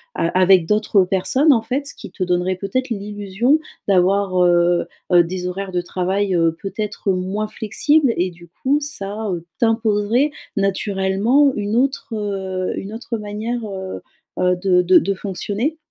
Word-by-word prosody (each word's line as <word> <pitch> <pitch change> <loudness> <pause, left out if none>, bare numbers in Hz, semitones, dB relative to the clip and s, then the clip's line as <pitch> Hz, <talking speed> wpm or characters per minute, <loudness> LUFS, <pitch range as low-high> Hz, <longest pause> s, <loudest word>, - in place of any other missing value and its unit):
a - - 0
avec 185 -2 +5
d'autres 210 0 +3
personnes, 255 - +3
en 230 - +2
fait, 260 +5 -3
ce - - -6
qui - - -10
te 185 - -3
donnerait 180 +1 0
peut-être 205 +8 -2
l'illusion 205 +5 0 0.3
d'avoir, 195 0 +2
heu 175 0 +3 0.2
heu, 175 -1 +7
des 180 +1 -4
horaires 190 +1 -4
de 180 -1 0
travail, 190 +2 -1
heu, 165 -1 +3
peut-être 200 0 -3
moins 190 +3 -2
flexibles 255 +6 +1
et 180 +1 0
du 170 0 -16
coup, 265 - 0
ça, 220 -7 -5
heu, 175 -3 -3 0.2
t'imposerait 225 +4 +2 0.3
naturellement 200 +7 +2
une 205 +1 -2
autre 265 -1 0 0.6
une 200 +2 -6
autre 230 +1 -4
manière, 215 +3 -4
heu 190 -2 -6 0.4
heu, 180 0 +3
de 180 0 +2
de 180 +1 +5
de 195 - -1
fonctionner? 205 - -3
200 Hz, 155 wpm, -20 LUFS, 185-225 Hz, 0.6 s, heu